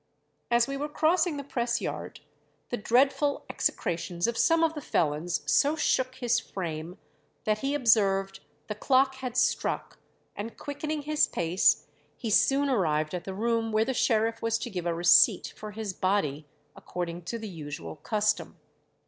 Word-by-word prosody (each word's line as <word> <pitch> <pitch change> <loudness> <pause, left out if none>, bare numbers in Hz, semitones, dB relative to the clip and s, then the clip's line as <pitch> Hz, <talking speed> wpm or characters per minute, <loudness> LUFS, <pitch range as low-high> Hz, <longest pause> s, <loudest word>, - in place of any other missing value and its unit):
As 235 +1 +3
we 275 0 -3
were 295 +2 -3
crossing 320 +1 +2
the 280 - -5
press 240 -3 -1
yard, - - -5 0.5
the - - -1
dreadful 270 +6 +2
execrations 175 0 -1
of 235 - 0
some 330 +5 +3
of 325 -1 +2
the 300 - -6
felons 155 - -1
so 280 - +3
shook 255 -4 0
his 240 -1 +1
frame 170 -1 -6 0.5
that 215 0 0
he 275 +3 -1
observed 195 -7 +2 0.3
'the 210 - -4
clock 265 +5 +2
had 255 -2 -5
struck;' 250 - 0 0.4
and 220 +3 -6
quickening 295 +1 -4
his 305 +1 +2
pace, 175 +2 +2 0.3
he 225 -4 -4
soon 275 +6 +3
arrived 155 - +1
at 180 -1 -4
the 190 - -5
room 225 +1 0
where 215 +1 +2
the 265 - -1
sheriff 225 -2 +1
was 230 0 +1
to 230 +1 -6
give 180 -3 -3
a 170 - +1
receipt 175 +1 +5
for 215 - -8
his 210 -2 -5
body, 155 -7 -1 0.3
according 175 -1 -5
to 230 - -3
the 220 -1 -7
usual 150 -7 -7
custom. 215 +6 -1
225 Hz, 165 wpm, -28 LUFS, 180-265 Hz, 0.5 s, receipt